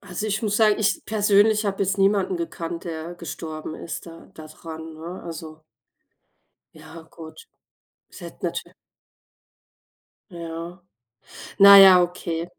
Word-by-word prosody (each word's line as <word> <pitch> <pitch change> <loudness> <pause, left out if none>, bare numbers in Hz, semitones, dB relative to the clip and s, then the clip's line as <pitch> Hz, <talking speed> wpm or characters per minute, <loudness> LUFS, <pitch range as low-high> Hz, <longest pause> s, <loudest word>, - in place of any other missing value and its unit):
Also, 200 +2 -6
ich 210 0 -2
muss 210 -1 -1
sagen, 215 -2 +3
ich 210 0 0
persönlich 210 0 +2
habe 195 0 -2
jetzt 195 0 -1
niemanden 195 -1 +1
gekannt, 170 0 -6
der 165 +1 -6
gestorben 155 -2 -8
ist 170 - -8
da 165 +2 -14
da 155 -2 -11
dran, 160 0 -10
ne? 170 +4 -9
Also 160 -2 -9 1.1
Ja, 160 +1 -13
gut, 160 - -13 0.6
es - - -14
hätte - - -8
natü - - -6 1.6
Ja, 170 -1 -7 0.9
na 200 0 +10
ja, 190 -2 +8
okay. 170 -1 -3
175 Hz, 130 wpm, -23 LUFS, 165-200 Hz, 1.6 s, na